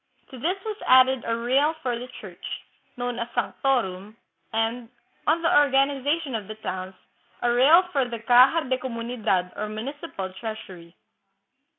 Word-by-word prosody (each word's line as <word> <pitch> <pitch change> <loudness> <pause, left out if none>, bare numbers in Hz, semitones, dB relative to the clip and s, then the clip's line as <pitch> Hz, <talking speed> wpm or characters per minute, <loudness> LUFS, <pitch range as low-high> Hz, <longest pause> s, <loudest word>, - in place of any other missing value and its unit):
To 260 - -9
this 350 +9 0
was 430 -1 -4
added 260 -1 +5
a 230 0 0
real 270 +7 +2
for 250 -2 0
the 245 +2 -6
church, 180 -4 -12 0.5
known 245 0 -3
as 235 - -2
" - - -21
sanctorum," 220 -5 -1 0.3
and, 225 +1 -1 0.4
on 330 +2 +2
the 330 - +4
organization 280 +1 +1
of 215 -4 -4
the 215 - -7
towns, 190 -3 -6 0.5
a 240 0 +3
real 295 +9 +6
for 275 -3 +1
the 235 - -4
caja 255 +6 +5
de 260 0 0
communidad 230 -7 -2
or 215 - -4
municipal 215 - -6
treasury. 185 -5 -8
245 Hz, 155 wpm, -25 LUFS, 215-270 Hz, 0.5 s, real